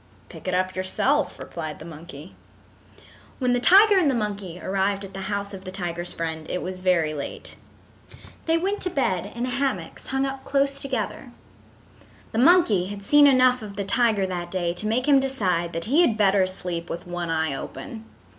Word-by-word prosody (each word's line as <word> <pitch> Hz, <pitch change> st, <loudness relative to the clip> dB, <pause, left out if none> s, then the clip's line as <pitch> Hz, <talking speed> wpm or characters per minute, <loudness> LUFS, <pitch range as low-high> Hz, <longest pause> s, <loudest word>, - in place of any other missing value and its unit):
"Pick -, -, -11 dB
it 185 Hz, -, 0 dB
up 185 Hz, 0 st, -1 dB
yourself," 265 Hz, +10 st, 0 dB
replied 155 Hz, -3 st, -6 dB
the 155 Hz, -, -11 dB
monkey. 160 Hz, 0 st, -11 dB, 1.0 s
When 250 Hz, -2 st, +1 dB
the 245 Hz, -, +2 dB
tiger 395 Hz, -, +7 dB
and 325 Hz, -6 st, +3 dB
the 265 Hz, -, +1 dB
monkey 200 Hz, -5 st, -4 dB
arrived 195 Hz, +1 st, -1 dB
at 195 Hz, -, -12 dB
the 195 Hz, -, -6 dB
house 200 Hz, 0 st, -2 dB
of 190 Hz, -1 st, -8 dB
the 185 Hz, -, -7 dB
tiger's 175 Hz, -2 st, -4 dB
friend 160 Hz, -1 st, -5 dB
it 180 Hz, -, -3 dB
was 185 Hz, 0 st, -5 dB
very 170 Hz, -4 st, +2 dB
late. 145 Hz, -2 st, -6 dB, 0.9 s
They 325 Hz, 0 st, +3 dB
went 390 Hz, +4 st, -1 dB
to 365 Hz, -, -1 dB
bed 200 Hz, -, -1 dB
in 240 Hz, +1 st, -2 dB
hammocks 270 Hz, +2 st, -3 dB
hung 270 Hz, +1 st, 0 dB
up 270 Hz, 0 st, -5 dB
close 275 Hz, 0 st, +1 dB
together. 255 Hz, -1 st, -3 dB, 1.0 s
The 220 Hz, -, -1 dB
monkey 250 Hz, -, +4 dB
had 200 Hz, 0 st, -7 dB
seen 290 Hz, +7 st, +6 dB
enough 255 Hz, -2 st, +4 dB
of 205 Hz, -2 st, -8 dB
the 200 Hz, -1 st, -3 dB
tiger 220 Hz, -1 st, +2 dB
that 175 Hz, -2 st, -4 dB
day 175 Hz, -2 st, -1 dB
to 195 Hz, +5 st, -2 dB
make 245 Hz, +5 st, 0 dB
him 280 Hz, -2 st, +6 dB
decide 185 Hz, -11 st, 0 dB
that 165 Hz, 0 st, -3 dB
he 285 Hz, -, +3 dB
had 235 Hz, -11 st, +3 dB
better 195 Hz, -2 st, +3 dB
sleep 180 Hz, -2 st, -5 dB
with 170 Hz, -, -5 dB
one 175 Hz, -1 st, -4 dB
eye 160 Hz, -2 st, 0 dB
open. 225 Hz, -, -8 dB
200 Hz, 190 wpm, -24 LUFS, 180-260 Hz, 1.0 s, tiger